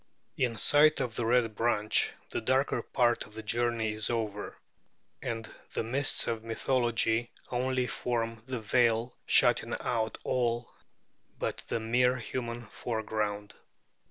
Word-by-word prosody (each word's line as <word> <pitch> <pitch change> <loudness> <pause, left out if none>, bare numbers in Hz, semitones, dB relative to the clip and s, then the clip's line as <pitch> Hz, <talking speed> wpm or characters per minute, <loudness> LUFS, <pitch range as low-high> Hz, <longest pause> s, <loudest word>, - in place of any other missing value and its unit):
In 120 -3 0
sight 155 +5 +5
of 120 - -1
the 115 - -1
Red 120 -2 +3
Branch, 110 -1 +2 0.2
the - - -2
darker 135 +2 +1
part 120 -2 +1
of 105 - -15
the 110 - -6
journey 115 0 0
is 110 0 0
over; 110 -3 -3 0.6
and 115 -2 -4 0.3
the - - -1
mists 135 +5 +2
of 115 -1 -2
mythology 120 -1 +1 0.2
only 130 +1 0
form 115 -2 -2
the 130 -2 -3
veil 115 +1 +2
shutting - - +4
out 110 -2 -1
all 120 -1 0 0.7
but - - -2
the - - -1
mere 125 +3 +2
human 120 0 -4
foreground. 105 -2 -3
115 Hz, 130 wpm, -30 LUFS, 110-125 Hz, 0.7 s, sight